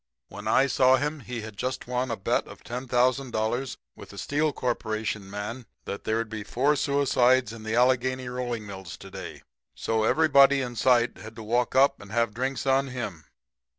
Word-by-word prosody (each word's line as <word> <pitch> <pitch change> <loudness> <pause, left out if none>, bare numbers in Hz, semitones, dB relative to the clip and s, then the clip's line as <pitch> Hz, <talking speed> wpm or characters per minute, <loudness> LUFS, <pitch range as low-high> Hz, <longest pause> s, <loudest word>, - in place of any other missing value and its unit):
"'When - - -8
I 135 - +4
saw 130 -1 +4
him 150 +3 -2
he'd 110 -4 -7
just 130 +3 -3
won 125 +1 -1
a 115 - -2
bet 95 - 0
of - - -13
$10,000 125 0 0 0.2
with - - -12
a - - -12
Steel 150 +1 0
Corporation 110 -5 -3
man 105 +5 -6 0.2
that 100 - -6
there'd 110 +1 0
be 110 -1 -6
four 135 +8 +1
suicides 130 -4 +2
in 115 - -9
the 110 +1 -2
Allegheny 130 +1 +2
rolling 120 -3 -3
mills 95 -3 -8
to - - -12
day. - - -8 0.3
So 110 -1 0
everybody 140 0 +5
in 125 -2 -4
sight 120 0 +3
had 110 0 -10
to 110 - -8
walk 120 +3 0
up 135 +2 +4
and 100 -1 -12
have 115 -1 +1
drinks 130 +3 -2
on 135 +1 +3
him. 110 - -6
125 Hz, 180 wpm, -27 LUFS, 110-130 Hz, 0.3 s, everybody